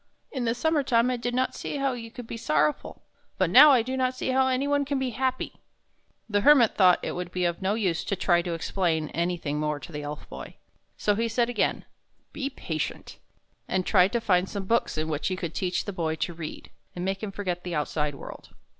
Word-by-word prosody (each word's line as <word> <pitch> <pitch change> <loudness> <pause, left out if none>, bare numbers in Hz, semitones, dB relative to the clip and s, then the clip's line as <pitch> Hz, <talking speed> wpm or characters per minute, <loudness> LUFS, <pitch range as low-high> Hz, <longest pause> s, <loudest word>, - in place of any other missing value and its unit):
In 255 -4 -2
the 230 0 +1
summer 315 +4 +1
time 245 -2 +2
I - - 0
did 245 +1 -3
not 255 +1 +1
see - - -5
how 275 -1 0
you 230 -2 -7
could 240 +1 -9
be 230 - -6
sorrow 150 -8 +2
ful; - - -13 0.3
but 185 -3 +1
now 290 +8 +10
I 255 -5 +5
do 260 +3 -3
not 255 -1 0
see 255 - -3
how 260 0 +3
any 260 +2 0
one 285 0 +2
can 280 0 -2
be 265 -1 -1
happy." 260 +1 -2 0.7
The 205 -2 +1
Hermit 265 -3 +6
thought 185 -3 +5
it - - -2
would 175 0 -5
be 180 -1 -1
of 170 +2 -1
no 195 +2 +1
use 185 -7 0
to 200 - -1
try 175 -2 +2
to 170 -1 -3
explain 165 -3 -1
anything 170 -3 -2
more 150 -1 -1
to 170 - -10
the 150 -1 -5
Elf 145 0 -7
Boy; - - -9 0.4
so 205 - +2
he 230 +3 0
said 235 +1 +1
again, 230 - 0 0.2
" - - -44
Be 280 -2 -3
patient," 160 - -5 0.5
and 185 -1 0
tried 185 -2 +4
to 235 - +2
find 190 -4 +2
some 200 -2 -4
books 230 -5 +1
in 155 0 -1
which 155 -1 -2
he 185 - -1
could 170 -3 -5
teach 180 -1 -1
the 205 - -4
Boy 160 -3 -1
to 170 - -3
read, 160 -2 -8 0.2
and 180 0 -3
make 195 0 -2
him 215 -2 -4
forget 185 -3 -3
the 175 -2 -4
outside 150 -1 -1
world. - - -11
195 Hz, 235 wpm, -26 LUFS, 170-245 Hz, 0.7 s, now